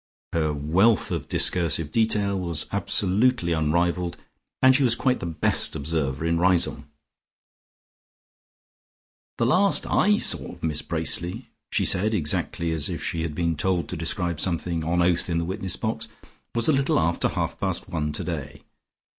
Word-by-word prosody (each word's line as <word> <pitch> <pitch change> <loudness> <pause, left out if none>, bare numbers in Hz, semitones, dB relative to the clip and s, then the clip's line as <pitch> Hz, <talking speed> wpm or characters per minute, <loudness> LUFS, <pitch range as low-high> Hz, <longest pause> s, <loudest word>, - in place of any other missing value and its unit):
Her 80 -2 0
wealth 85 +10 +2
of - - -4
discursive 80 -3 +1
detail 105 -3 +1
was 85 -4 0
absolutely 100 0 +1
unrivalled, 85 +2 0 0.4
and 130 0 +5
she 140 - +2
was 120 -3 +3
quite 130 +1 0
the 85 - -5
best 80 -2 +2
observer 70 -1 -2
in 85 0 +1
Riseholme. 90 -1 +1 2.5
"The 115 - +1
last 185 +10 +3
I 210 0 +2
saw - - +4
of - - -16
Miss 75 -2 0
Bracely," 85 +1 -3 0.2
she - - +1
said 105 +4 +1
exactly 85 0 -1
as 80 -1 -1
if 85 -5 -5
she 85 - -2
had 80 -2 -4
been 85 -1 -1
told 90 +3 -1
to - - -3
describe 85 0 -2
something 85 -2 -1
on 85 +2 +1
oath 90 0 +1
in 85 - 0
the 85 - -1
witness 95 0 -3
box, 110 0 -3 0.5
"was 115 - +3
a 155 - +4
little 135 0 +1
after 85 +1 0
half - - -3
past - - -2
one 75 -2 -3
today. 75 -3 -6
85 Hz, 155 wpm, -24 LUFS, 80-100 Hz, 2.5 s, and